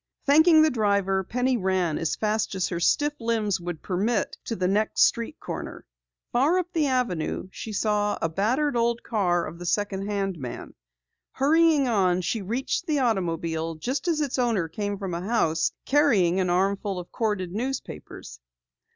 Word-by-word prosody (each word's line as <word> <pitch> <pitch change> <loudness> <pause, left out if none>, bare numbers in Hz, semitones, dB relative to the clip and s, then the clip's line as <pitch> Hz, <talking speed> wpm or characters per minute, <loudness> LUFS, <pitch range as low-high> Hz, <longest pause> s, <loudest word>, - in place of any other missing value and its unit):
Thanking 315 +3 +6
the 315 - +3
driver, 200 -4 +1
Penny 250 +5 0
ran 185 -5 0
as 160 -1 -1
fast 215 -1 -1
as 185 - -1
her 170 - -3
stiff 290 - +2
limbs 225 -4 0
would 175 -3 -6
permit 205 +5 -1
to 230 - -3
the 180 -2 0
next 205 +3 +2
street 235 +6 0
corner. - - -7 0.5
Far 280 +9 +3
up 360 0 -2
the 310 -3 +2
avenue 230 - -1
she 220 - -7
saw 210 0 0
a - - 0
battered 245 - 0
old 235 0 +1
car 180 -6 0
of 170 +2 -8
the 175 - -7
second 200 0 -1
hand 195 -4 -2
man. 125 -3 -7 0.6
Hurrying 305 0 +3
on, 185 -6 +2
she 215 +5 -2
reached 245 - -2
the 305 -2 +1
automobile 165 - -1
just 255 - -3
as 320 -3 +1
its 275 -3 -1
owner 225 -9 +1
came 205 +4 -3
from 190 -3 -5
a 170 - -3
house 170 -6 +1
carrying 215 - +3
an 185 -1 +1
armful 195 +2 0
of 175 -1 -8
corded 210 -6 -2
newspapers. 210 - -6
205 Hz, 170 wpm, -25 LUFS, 180-250 Hz, 0.6 s, Thanking